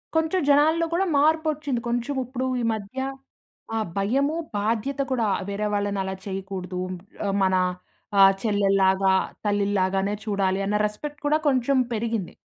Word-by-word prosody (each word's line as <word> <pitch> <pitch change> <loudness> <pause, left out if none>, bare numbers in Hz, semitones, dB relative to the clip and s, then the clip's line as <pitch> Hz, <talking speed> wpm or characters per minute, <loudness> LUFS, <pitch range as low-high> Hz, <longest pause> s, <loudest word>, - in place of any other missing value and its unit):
కొంచెం 320 +3 +2
జనాల్లో 315 +4 +4
కూడా 380 +3 +2
మార్పొచ్చింది. 305 -3 +1
కొంచెం, 240 +4 -1
ఇప్పుడు 255 +1 -3 0.2
ఈ - - -2
మధ్య 210 +3 -7 0.8
ఆ - - +1 0.2
భయము 270 +10 +1 0.2
బాధ్యత 230 +6 -1
కూడా 235 -4 +1 0.2
వేరే 210 +1 -1
వాళ్ళని 205 -1 -1
అలా 190 0 -4
చేయకూడదు. 190 -2 -5 0.5
ఆహ్, 200 -1 0
మన 185 0 +3 0.6
ఆహ్, 195 0 +8
చెల్లెల్లాగా, 195 -2 +3 0.3
తల్లిల్లాగానే 200 -1 +1
చూడాలి 195 -2 0
అన్న 210 +1 +1
రెస్పెక్ట్ 290 +8 -5
కూడా 300 +1 +3
కొంచెం 265 0 +2 0.2
పెరిగింది. 225 -4 -2
210 Hz, 130 wpm, -25 LUFS, 195-280 Hz, 0.8 s, ఆహ్